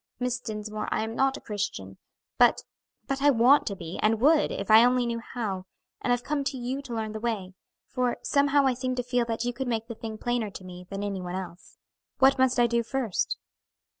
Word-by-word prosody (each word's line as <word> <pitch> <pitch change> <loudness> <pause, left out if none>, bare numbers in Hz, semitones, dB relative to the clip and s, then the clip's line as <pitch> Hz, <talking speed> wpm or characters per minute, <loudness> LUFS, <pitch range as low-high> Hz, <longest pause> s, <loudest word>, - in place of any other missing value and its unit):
Miss 250 0 -1
Dinsmore, 215 -2 -5
I - - 0
am 225 +1 -5
not 270 +1 +2
a - - -12
Christian, 100 - -4 0.4
but - - +5 0.4
but 275 0 -3
I 290 - +6
want 260 +2 +5
to 200 - -2
be, 170 -1 -7
and 215 +1 +2
would, 300 +5 +4
if 195 +1 -3
I 220 +1 +9
only 250 0 +3
knew 235 -1 -2
how; 205 -6 -4 0.3
and 245 - 0
I've 245 0 +1
come 290 0 -1
to 270 - -2
you 255 +3 -3
to 255 -4 -6
learn 220 -1 -3
the 215 - -5
way; 210 -5 -3 0.3
for 250 -2 -1
somehow 280 -1 +3
I 265 - +3
seem 255 +1 -2
to 250 - -2
feel 245 -1 0
that 230 0 -2
you 245 - -1
could 260 +2 -4
make 225 -2 -1
the 235 - -5
thing 220 -1 -7
plainer 240 -2 -1
to 195 - -10
me 180 0 -10
than 195 0 -4
any 200 -2 -3
one 180 0 -5
else. 185 -2 -8 0.4
What 265 0 +5
must 260 -1 +3
I 240 - +6
do 235 0 +1
first?" 235 -4 -1
235 Hz, 225 wpm, -27 LUFS, 210-255 Hz, 0.4 s, I